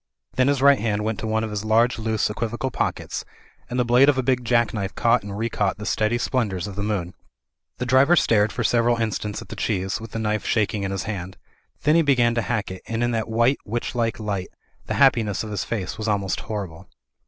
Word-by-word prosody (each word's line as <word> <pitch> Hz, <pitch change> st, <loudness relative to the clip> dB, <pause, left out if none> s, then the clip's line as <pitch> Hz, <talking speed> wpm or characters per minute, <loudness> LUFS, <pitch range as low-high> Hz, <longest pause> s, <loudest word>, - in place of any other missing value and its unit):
Then 130 Hz, 0 st, +2 dB
his 140 Hz, -1 st, +1 dB
right 140 Hz, -1 st, +6 dB
hand 105 Hz, -1 st, -1 dB
went 110 Hz, 0 st, -2 dB
to 110 Hz, -, -4 dB
one 110 Hz, 0 st, 0 dB
of 110 Hz, -, -4 dB
his 105 Hz, 0 st, -3 dB
large 115 Hz, +2 st, +2 dB
loose 110 Hz, -1 st, 0 dB
equivocal 115 Hz, +4 st, -3 dB
pockets, -, -, -2 dB, 0.5 s
and 125 Hz, -, -2 dB
the 125 Hz, -, +2 dB
blade 125 Hz, +4 st, +5 dB
of 140 Hz, -, +2 dB
a 130 Hz, -, +1 dB
big 125 Hz, -1 st, +1 dB
jack 120 Hz, -1 st, +2 dB
knife 100 Hz, -3 st, -3 dB
caught 120 Hz, +1 st, +3 dB
and 100 Hz, 0 st, -7 dB
recaught 105 Hz, -4 st, -1 dB
the 105 Hz, -, -7 dB
steady 110 Hz, +3 st, +1 dB
splen 120 Hz, -2 st, 0 dB
dours 95 Hz, -2 st, -4 dB
of 100 Hz, -2 st, -7 dB
the 100 Hz, -, -3 dB
moon. 100 Hz, -4 st, -2 dB, 0.6 s
The 125 Hz, -, -3 dB
driver 130 Hz, +7 st, +5 dB
stared 110 Hz, -8 st, +3 dB
for 120 Hz, -, -3 dB
several 120 Hz, +1 st, +2 dB
instants 105 Hz, -2 st, -2 dB
at -, -, -20 dB
the -, -, -6 dB
cheese, 95 Hz, -1 st, -2 dB
with 115 Hz, -, -8 dB
the 115 Hz, -, -6 dB
knife 110 Hz, -1 st, -1 dB
shaking 105 Hz, -2 st, 0 dB
in 100 Hz, -, -2 dB
his 95 Hz, 0 st, -3 dB
hand. 95 Hz, -3 st, -5 dB, 0.5 s
Then 150 Hz, -, +4 dB
he 165 Hz, -, +5 dB
began 125 Hz, -6 st, +3 dB
to 115 Hz, -, 0 dB
hack 110 Hz, -5 st, -2 dB
it, 95 Hz, -, -8 dB
and 115 Hz, +1 st, -1 dB
in 120 Hz, -, +1 dB
that 115 Hz, -1 st, -2 dB
white 115 Hz, +4 st, +2 dB
witchlike 115 Hz, 0 st, -2 dB
light 100 Hz, -4 st, -3 dB, 0.4 s
the -, -, -2 dB
hap* 135 Hz, -1 st, +6 dB
piness 110 Hz, -4 st, -2 dB
of 110 Hz, -, -6 dB
his 100 Hz, -4 st, -2 dB
face 110 Hz, -2 st, -4 dB
was 110 Hz, -, -3 dB
almost 100 Hz, -2 st, 0 dB
horrible. 95 Hz, -5 st, -6 dB
110 Hz, 235 wpm, -23 LUFS, 105-120 Hz, 0.6 s, right